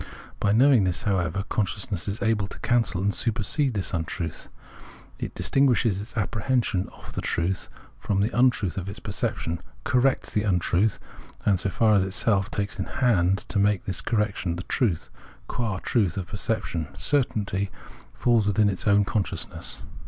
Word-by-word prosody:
By 105 - +2
knowing 125 0 +5
this, 90 -2 -1
however, 95 -1 0
consciousness 100 -2 -2
is 100 +2 -3
able 110 -3 +1
to - - -10
cancel 115 -6 +1
and 100 0 +2
supersede 115 +5 0
this 95 - -2
untruth. 85 -1 -3 0.7
It - - -5
distin 135 +1 +3
guishes 110 -5 +2
its 110 +2 -10
apprehension 110 -2 0
of - - -12
the - - -3
truth 90 +3 -1 0.3
from 100 -2 0
the 105 +4 0
untruth 120 -9 +2
of 95 0 -3
its 100 - -7
perception, 85 -5 -2 0.2
corrects 135 -3 +1
this 105 - +1
untruth, 95 +1 +2 0.5
and, 100 -3 +3
so 100 - 0
far 110 +2 +3
as 100 -2 +4
itself 100 0 +1
takes 100 0 -3
in - - -1
hand 100 -7 +2
to 100 - +1
make 100 -1 +2
this 95 -2 -1
correction, 105 -6 0
the 90 - -5
truth, 95 -8 0 0.4
qua 115 -6 -2
truth 100 -3 0
of 95 - -2
perception, 100 -6 -2
certainly 105 -8 0 0.5
falls 115 -4 +3
within 105 0 +3
its 95 +2 -3
own 100 0 +5
consciousness. 100 -1 -3
100 Hz, 160 wpm, -26 LUFS, 95-115 Hz, 0.7 s, knowing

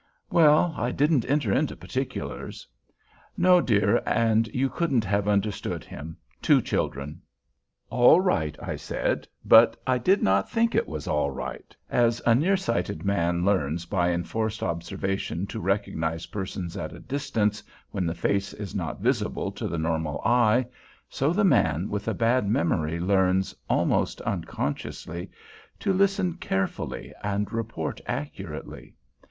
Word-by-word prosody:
"Well, 160 +1 +5
I 120 -1 -1
didn't 140 -2 +1
enter 140 -8 +2
into - - +1
particulars." - - -5 0.7
"No, 180 0 +5
dear, 100 - +3
and 115 -1 +2
you 130 +4 0
couldn't 135 -7 0
have 100 +1 0
understood 105 0 -1
him. 80 +3 -9 0.2
Two - - +5
children." 70 +3 -3 0.7
"All 125 +7 +6
right," 80 - 0
I - - -4
said; - - -2 0.2
but 115 0 +7
I 130 -1 +2
did 190 - +3
not 95 0 +2
think 230 0 +1
it - - +1
was 75 -2 -6
all 75 -1 +1
right. 65 - -7
As 120 -1 +2
a 120 - +6
nearsighted 170 - 0
man 85 -3 +1
learns 85 -4 +1
by 90 -1 +1
enforced 110 +6 -2
observation 95 +1 -2
to - - -6
recognize 80 -4 -1
persons 95 -3 -5
at 100 - -5
a - - -10
distance 110 -6 -1 0.3
when 95 -4 -1
the 85 - -2
face 100 +3 0
is 100 -3 -7
not - - -4
visible - - 0
to - - -4
the 85 - -3
normal 80 -2 -1
eye, 120 0 +4 0.4
so 140 +4 0
the 205 +5 +1
man 90 - +3
with 105 0 -3
a 110 - 0
bad 115 -2 +2
memory 85 -4 0
learns, 95 +1 +2 0.2
almost - - +1
unconsciously, 85 +5 -4 0.5
to 195 - +1
listen 195 -1 +2
carefully 95 - -3
and 105 +1 -2
report 115 -8 -3
accurately. 75 +1 -6
100 Hz, 140 wpm, -26 LUFS, 85-125 Hz, 0.7 s, but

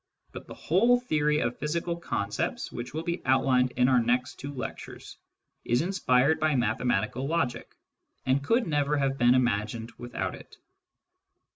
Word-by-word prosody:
but - - -10
the - - -9
whole 235 +9 +3
theory 150 -10 +1
of 120 -4 -2
physical 170 +3 -2
concepts 105 -11 -3
which 120 - -6
1 150 - -6
will 160 - -4
be 170 +1 -2
outlined 130 -1 +3
in 125 0 +4
our 130 -2 +4
next 125 +5 -1
two 140 - -6
lectures, 130 -3 -8 0.5
is 120 +5 +1
inspired 160 -6 +2
by: 155 -2 +2
mathematical 120 +1 0
logic, 140 -7 -2 0.5
and 130 +2 +1
could 230 - +2
never 150 -2 0
have 135 -1 0
been 120 +1 +5
imagined! 115 -1 0
without 120 0 -4
it. - - -13
135 Hz, 155 wpm, -27 LUFS, 120-155 Hz, 0.5 s, been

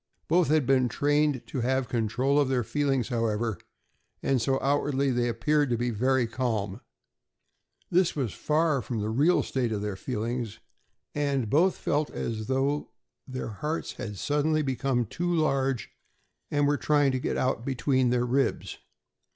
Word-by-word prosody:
Both 170 +1 +3
had 155 -2 +3
been 130 -2 +3
trained 145 +1 +1
to 130 - -4
have 130 +1 0
control 120 +5 +1
of 140 -2 +2
their 125 -2 +1
feelings, 135 -1 0
however, 115 -4 -1 0.6
and 135 -3 +2
so 135 +2 +1
outwardly 140 -1 +1
they 120 -1 +1
appeared 145 +5 +1
to 120 - +1
be 120 +1 -1
very 130 +3 +2
calm. 115 -3 -2 1.1
This 180 0 +3
was 130 -8 -2
far 155 -2 +1
from 120 - -5
being 105 - -2
the 110 - -2
real 155 +7 +4
state 125 -4 -1
of 105 -2 -2
their 105 -2 -3
feelings, 115 +1 -3 0.6
and 140 -6 -1
both 180 +6 +3
felt 150 -3 0
as 110 -2 -4
though 135 +3 0 0.4
their 130 -3 -5
hearts 150 +10 -3
had 105 -3 -6
suddenly 150 +5 +1
become 130 -2 0
too 175 - -2
large 135 -6 0 0.6
and 145 -1 +2
were 145 0 +2
trying 145 -2 +3
to 130 - -1
get - - -2
out 130 -2 0
between 130 -1 +1
their 125 0 +1
ribs. 130 +1 -1
130 Hz, 160 wpm, -27 LUFS, 120-145 Hz, 1.1 s, real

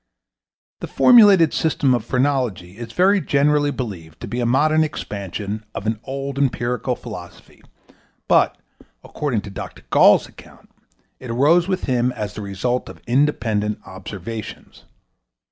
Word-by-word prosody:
The - - -6
formulated 205 - +6
system 145 -4 +1
of 120 -3 0
phrenology 125 -8 -1
is 115 -1 -7
very 190 - +3
generally 145 0 +2
believed 95 - -6
to - - -6
be 120 - -4
a 120 - 0
modern 155 +5 +3
expansion 105 - -5
of 100 - -5
an 110 0 -1
old 140 0 -4
empirical 125 -3 -1
philosophy, - - -11 0.7
but, - - +3 0.5
according 130 -8 -2
to 100 - -10
Dr. 95 - -8
Gall's - - +5
account, - - -17 0.5
it 130 - -9
arose 150 +9 +3
with 185 -1 -2
him 125 -1 +1
as 105 -4 -5
the 105 - -7
result 105 +6 -2
of - - -12
independent 115 -6 0
observations. 100 +3 -9
125 Hz, 135 wpm, -21 LUFS, 105-145 Hz, 0.7 s, formulated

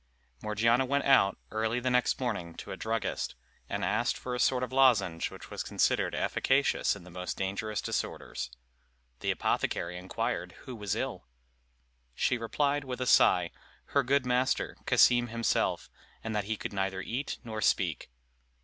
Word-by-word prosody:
Morgiana 115 +4 +2
went 140 +2 0
out, 135 -8 +5
early 110 +2 0
the 130 +1 0
next 125 0 +2
morning 100 -10 -3
to - - -8
a - - -3
druggist, 110 - -2 0.3
and - - -1
asked - - +1
for 125 - -5
a 125 - -2
sort 125 0 +2
of 125 - -4
lozenge 110 -11 +3
which - - -11
was - - -3
considered - - +1
efficacious 135 -4 +2
in 100 - -11
the 90 - -13
most 90 +1 -5
dangerous 100 +3 -2
disorders. 65 0 -3 0.7
The - - -2
apothecary 90 +1 -1
inquired 90 +1 -3
who 130 - -7
was 105 -3 -2
ill. - - -4 0.9
She 125 - +1
replied, 145 +5 0
with 130 -1 -5
a 125 - -1
sigh, - - +5 0.4
Her 140 - +5
good 135 +1 +2
master, 125 +1 +1
Cassim 120 -1 +5
himself, 115 0 0 0.4
and 110 -1 -3
that 105 -2 0
he 110 +1 -2
could - - -5
neither 95 -1 -1
eat 130 +8 -3
nor 110 -3 -5
speak. 85 -8 +1
115 Hz, 160 wpm, -30 LUFS, 95-125 Hz, 0.9 s, out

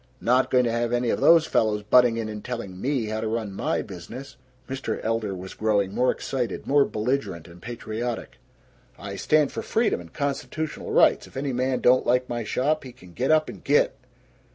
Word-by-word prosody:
Not 125 +2 +2
going 125 -1 +4
to 120 - 0
have 115 0 -1
any 120 -1 +1
of - - -1
those 165 -1 +6
fellows 105 -7 +1
butting 120 +2 +5
in 115 -1 -2
and 105 -1 -7
telling 100 -7 -6
ME 130 -3 0
how 110 +1 -3
to 110 - -2
run 110 -2 -2
MY - - -1
business!" 115 +10 -9 0.3
Mr. 130 -4 -3
Elder 110 -3 -1
was 95 +1 -8
growing 100 -3 0
more 125 +3 +2
excited, 125 -6 -2
more 140 0 +4
belligerent 110 - -2
and 85 +1 -14
patriotic. 120 +1 -5 0.6
"I 100 +1 -7
stand 150 +6 +2
for - - -4
freedom 225 - 0
and 85 -1 -13
constitutional 150 +2 -3
rights. - - +4
If - - -12
any 135 -1 -2
man 130 +1 0
don't 125 +1 +4
like 125 +1 +2
my 120 -1 -3
shop, 145 +8 0
he 130 -2 -10
can 90 -8 -16
get 130 +7 -1
up 155 0 +4
and - - -9
git. 145 +1 +3
120 Hz, 200 wpm, -25 LUFS, 105-135 Hz, 0.6 s, those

